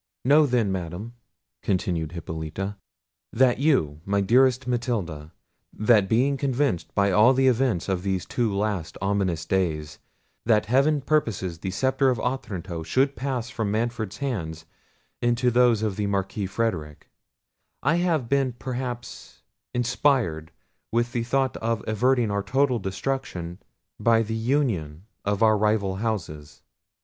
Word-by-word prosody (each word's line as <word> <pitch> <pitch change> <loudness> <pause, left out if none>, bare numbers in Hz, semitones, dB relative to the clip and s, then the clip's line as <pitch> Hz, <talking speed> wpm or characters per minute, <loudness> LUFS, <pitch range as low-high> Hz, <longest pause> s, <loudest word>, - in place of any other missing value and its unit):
"Know 145 +3 +6
then, 120 -6 +1
Madam," 95 +5 -5 0.5
continued 90 -5 -1
Hippolita, 85 +4 -5 0.6
"and 130 -2 +4
you 80 - +1
my 100 +1 0
dearest 125 +5 +3
Matilda, 105 - -2 0.4
that 105 -3 +3
being 135 +5 +2
convinced 135 - -1
by 100 0 +3
all 110 +7 +5
the 135 +1 +3
events 125 -8 +1
of 95 -2 -1
these 95 -1 -2
two 120 -3 -1
last 100 -5 -2
ominous 95 -4 0
days, 80 -5 -1 0.4
that 110 -2 +3
heaven 140 +6 +3
purposes 115 - -1
the 95 - -4
sceptre 130 +7 +1
of 125 -4 0
Otranto 95 -9 -3
should 130 - +1
pass 130 -3 -3
from 110 -4 -2
Manfred's 110 -1 -2
hands 85 - -4 0.6
into 120 +1 +2
those 120 -2 +4
of 105 -3 -1
the 105 -1 -1
Marquis 100 +1 -2
Frederic, 90 -8 -3 0.8
I 155 +5 +3
have 165 -8 +1
been 135 -1 +1
perhaps 125 -1 -6 0.3
inspired 125 - +1 0.4
with 120 +1 +1
the 120 -2 -1
thought 130 +2 0
of 115 -1 -2
averting 120 +1 +2
our 100 0 0
total 130 +2 +1
destruction 95 -4 -4 0.4
by 115 -1 +4
the 110 +1 -4
union 110 - -1 0.2
of 100 +1 0
our 110 -1 +5
rival 105 -3 +1
houses. 80 - -4
110 Hz, 135 wpm, -25 LUFS, 95-125 Hz, 0.8 s, Know